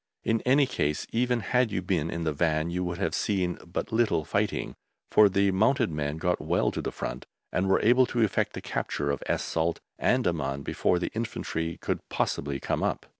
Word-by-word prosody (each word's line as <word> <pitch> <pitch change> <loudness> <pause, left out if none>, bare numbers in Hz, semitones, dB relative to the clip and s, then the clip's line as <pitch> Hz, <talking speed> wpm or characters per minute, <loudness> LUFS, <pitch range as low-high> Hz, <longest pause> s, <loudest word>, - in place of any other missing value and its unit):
In 115 0 +1
any 140 +2 +5
case, 75 - -1
even 125 0 +1
had 125 +3 +1
you 95 - -2
been 85 -4 0
in 85 0 -3
the 80 -2 0
Van 80 +1 +1
you 90 +1 -1
would 85 -1 -3
have 100 - -1
seen 95 -4 0
but 85 - -4
little 110 -8 +2
fighting, - - -1 0.4
for 105 -1 +7
the 100 +1 +2
mounted 110 +3 +2
men 75 0 -2
got 90 +2 0
well - - +1
to - - -3
the - - -3
front - - -5 0.2
and 95 +1 0
were 95 - +4
able 125 +3 +5
to 120 -1 +1
effect 105 - +1
the - - -6
capture 70 0 -2
of 70 - -3
Es - - 0
Salt 80 +1 -1 0.2
and - - +2
Amman 70 +1 -1
before 90 - +1
the 90 - -2
Infantry 85 -7 -3
could - - -2
possibly 70 -1 -1
come - - -1
up. - - -1
90 Hz, 205 wpm, -28 LUFS, 80-110 Hz, 0.4 s, for